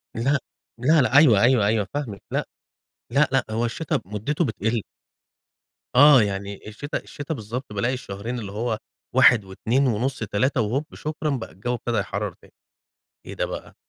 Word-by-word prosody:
لأ، 135 +6 +2 0.4
لأ، 150 +4 +4
لأ 130 +2 +3
أيوه، 120 -10 +7
أيوه، 120 -4 +4
أيوه 105 -2 +1
فاهمِك 120 -10 -4
لأ، - - -1 0.6
لأ، 140 +2 +4
لأ، 135 -1 +3
هو 115 +2 0
الشتا 150 +4 -1
مدته 110 - -1
بتقل. 110 0 -1 1.1
آه 140 -2 +8
يعني 100 0 -3
الشتا 145 +8 -4
الشتا 145 +2 -6
بالضبط 115 0 -6
بالاقي 120 +6 0
الشهرين 120 +1 -5
اللي 100 -3 -6
هو 110 +1 -2 0.4
1 125 -5 +6
و2 120 +8 0
ونص 125 +4 -1
3 115 +4 0
وهوب 130 +8 -1
شكرًا 155 0 -3
بقى 130 - -3
الجو 105 +9 -3
ابتدي 120 -1 -2
يحرر 100 -1 -3
تاني - - -22 0.7
إيه - - -7
ده - - -1
بقى - - -7
120 Hz, 160 wpm, -24 LUFS, 105-135 Hz, 1.1 s, آه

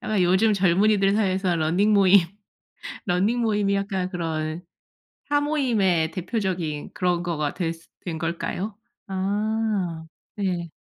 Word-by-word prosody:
아마 215 -3 -1
요즘 190 +5 +4
젊은이들 195 +1 +3
사이에서 190 -4 +1
러닝 175 +7 +2
모임, 200 -1 +6 0.9
러닝 200 +7 +1
모임이 205 -3 +1
약간 195 -2 -1
그런 160 -1 -3 0.6
사모임의 245 - +1
대표적인 180 -5 -3
그런 180 -4 0
거가 155 -4 -2
되스 165 -2 -4 0.2
된 170 -3 -3
걸까요? 170 +5 -3 0.3
아 200 -3 -1 0.3
네. 180 -4 -2
190 Hz, 250 characters per minute, -24 LUFS, 170-210 Hz, 0.9 s, 모임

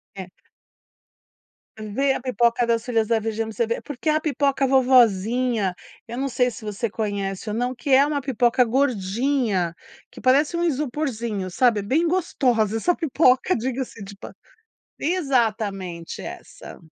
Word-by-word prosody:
É. 185 -2 -8 1.5
Ver 245 +6 0
a - - -3
pipoca 240 -1 +1
das 230 -1 +1
filhas 230 -3 0
da 230 0 +2
Virginia 225 0 -3
pra 220 - -8
você 235 - +1
ver. 230 - -2
Porque 290 +2 -4
é 305 - +3
a - - +2
pipoca 280 -3 0
vovozinha, 245 -4 +3 0.3
eu 235 +1 -6
não 275 +1 -1
sei 250 -1 +1
se 215 0 -10
você 210 +2 -3
conhece 200 -2 -3
ou 210 - -3
não 245 +2 -1
que 245 +3 -7
é 270 +2 +6
uma 290 -1 -1
pipoca 250 -1 +2
gordinha, 230 -5 0 0.4
que - - -12
parece 285 +6 +2
um 340 - 0
isoporzinho, 250 - -2
sabe, 235 +2 +2
é - - -4
bem 300 +11 +1
gostosa 250 - +1
essa 355 +11 +2
pipoca, 290 0 +2
diga-se 245 -2 -4
de 200 +1 -10
pa - - -10 0.7
exatamente 220 - -1
essa. - - -10
240 Hz, 155 wpm, -23 LUFS, 215-270 Hz, 1.5 s, é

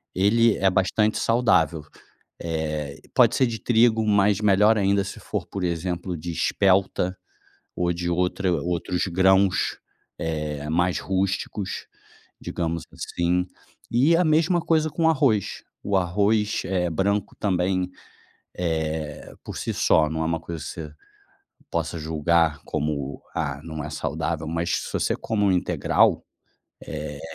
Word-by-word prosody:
ele 110 +4 +4
é 95 0 +3
bastante 105 +4 +2
saudável, 90 -10 +2 0.6
eh, 75 -3 -3 0.2
pode - - +5
ser 130 - +4
de 115 -1 -4
trigo, 115 -1 +3
mas 100 -1 +3
melhor 105 +2 +5
ainda 100 0 +2
se 95 - -7
for - - -4
por 95 -2 -5
exemplo, 90 +1 -2
de 85 +2 -5
espelta 95 +1 +1 0.6
ou 85 0 0
de 85 0 -3
outra 90 +1 0
outros 90 +1 -1
grãos, 95 +1 +3 0.4
eh, 75 -2 -3
mais 90 +2 +1
rústicos, 95 +1 -2 0.5
digamos 85 -1 -3
assim. 90 +1 -1 0.4
E 140 +8 +4
a 180 - +3
mesma 160 +3 +3
coisa 155 -1 +2
com 160 +1 +2
arroz, 130 - +1 0.2
o 100 -1 0
arroz, 105 +4 +1
eh, 90 -2 0
branco 100 +4 -1
também, 90 -1 0 0.7
eh, 80 -3 -3
por - - -7
si - - -3
só 75 -1 +3
não 80 0 -3
é - - -1
uma 80 0 0
coisa 80 0 -7
você 80 -2 -7 0.8
possa 85 - -2
julgar 80 0 +1
como: 70 -2 -3
"Ah, 70 -4 -2
não 80 -2 -6
é 75 - -5
saudável", 75 +2 -3
mas 85 +1 -1
se - - -6
você - - 0
come 105 -2 -2
um 95 - +4
integral, 90 - +2 0.6
eh, 75 -2 -6
90 Hz, 135 wpm, -24 LUFS, 80-100 Hz, 0.8 s, pode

